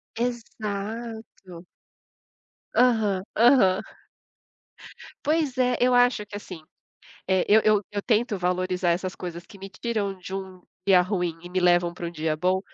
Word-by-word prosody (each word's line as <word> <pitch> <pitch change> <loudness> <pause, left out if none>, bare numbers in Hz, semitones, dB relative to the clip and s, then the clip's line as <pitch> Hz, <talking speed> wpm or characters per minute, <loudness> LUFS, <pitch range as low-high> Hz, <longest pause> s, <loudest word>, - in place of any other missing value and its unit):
Exato. 220 -5 -5 1.1
Aham, 220 -6 +3 0.2
aham 230 -6 +5 1.4
Pois 300 -4 +1
é, 250 -1 +2
eu 250 0 +3
acho 245 -3 +3
que 205 - -10
assim, 185 -5 -8 0.7
eh, 190 -1 +2
eu 215 +2 +6
eu 215 -1 +4
eu 205 0 -2
tento 225 0 +1
valorizar 180 0 0
essas 185 +2 -1
coisas 175 -1 -7
que - - -14
me 195 - -7
tiram 200 -2 -3
de 185 +1 -8
um 190 -1 -7 0.2
dia 190 -2 +6
ruim 180 -3 -2
e 175 - -10
me 185 +1 -1
levam 175 -1 +3
pra 175 - -7
um - - -7
dia 155 -2 -2
bom, 185 +4 +1
195 Hz, 145 wpm, -25 LUFS, 180-225 Hz, 1.4 s, eu